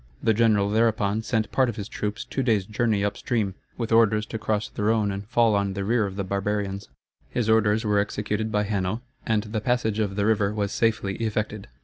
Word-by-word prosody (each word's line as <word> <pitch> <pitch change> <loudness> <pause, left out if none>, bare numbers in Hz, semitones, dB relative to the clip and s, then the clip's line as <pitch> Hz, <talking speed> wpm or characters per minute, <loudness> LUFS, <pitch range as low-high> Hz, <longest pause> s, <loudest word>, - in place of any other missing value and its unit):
The 115 - +4
general 105 -2 +3
thereupon 110 -1 +2
sent 110 -1 -1
part 130 -2 +3
of 115 - -4
his 100 -2 -5
troops 105 0 -4
two 135 - -2
days' 110 -7 +2
journey 105 -1 0
up 100 0 -1
stream, 110 -6 -1 0.2
with 115 -2 -3
orders 110 -2 +4
to 110 - -5
cross 110 -1 -1
the - - -7
Rhone 105 -1 +2
and 100 +1 -6
fall 115 -1 +3
on 100 -1 +1
the 100 0 -3
rear 110 0 +2
of 95 - -7
the 100 - -2
barbarians. 100 -1 -2 0.4
His 120 -3 -1
orders 110 0 +3
were 105 -1 +3
executed 105 +1 -2
by 105 0 +1
Hanno, 100 +2 -2 0.2
and 110 -2 +2
the 110 0 -3
passage 110 -2 0
of 100 -3 -1
the 100 0 +1
river 105 -1 +2
was 100 -1 -1
safely 105 -4 0
effected. 110 -2 -2
105 Hz, 215 wpm, -25 LUFS, 100-110 Hz, 0.4 s, The